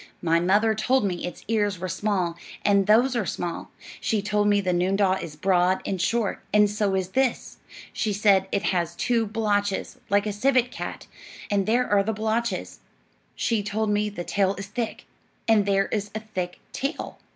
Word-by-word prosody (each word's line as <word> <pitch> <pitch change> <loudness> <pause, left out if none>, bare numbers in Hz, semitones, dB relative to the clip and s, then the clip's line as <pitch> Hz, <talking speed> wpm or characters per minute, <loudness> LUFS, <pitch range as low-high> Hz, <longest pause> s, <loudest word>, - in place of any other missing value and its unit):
My 165 0 +3
mother 205 +5 +3
told 250 +2 +1
me 180 -2 -2
its 180 - -9
ears 205 -3 +1
were 185 +2 -4
small, 185 -2 -1 0.3
and 200 -1 +4
those 245 +5 +4
are 235 - +1
small; 175 -2 -4 0.3
she 220 - 0
told 205 +1 +1
me 205 -1 +4
the 185 -2 0
noondah 190 +2 +2
is 155 -3 -7
broad 185 +2 +2
and 190 -3 -2
short, 230 -2 0
and 210 0 +5
so 205 -1 0
is 185 -1 -1
this; 260 +3 -1 0.4
she 220 - -1
said 195 -2 +3
it 200 - 0
has 170 -2 0
two 230 +2 +1
blotches, 205 -2 -1
like 205 +1 +3
a 210 - -2
civet 250 +3 +2
cat, - - -6 0.5
and 200 -1 +1
there 245 +3 +2
are 205 -1 +4
the 220 +3 -1
blotches; 220 +2 -2 0.6
she 225 -3 0
told 210 +1 -1
me 210 0 +1
the 200 -4 -6
tail 195 +1 +1
is 195 - -6
thick, 220 +3 -4 0.4
and 215 -3 +4
there 195 0 +3
is 205 -1 -2
a - - -1
thick 185 -5 -5
tail. 275 +3 -4
205 Hz, 185 wpm, -25 LUFS, 190-220 Hz, 0.6 s, and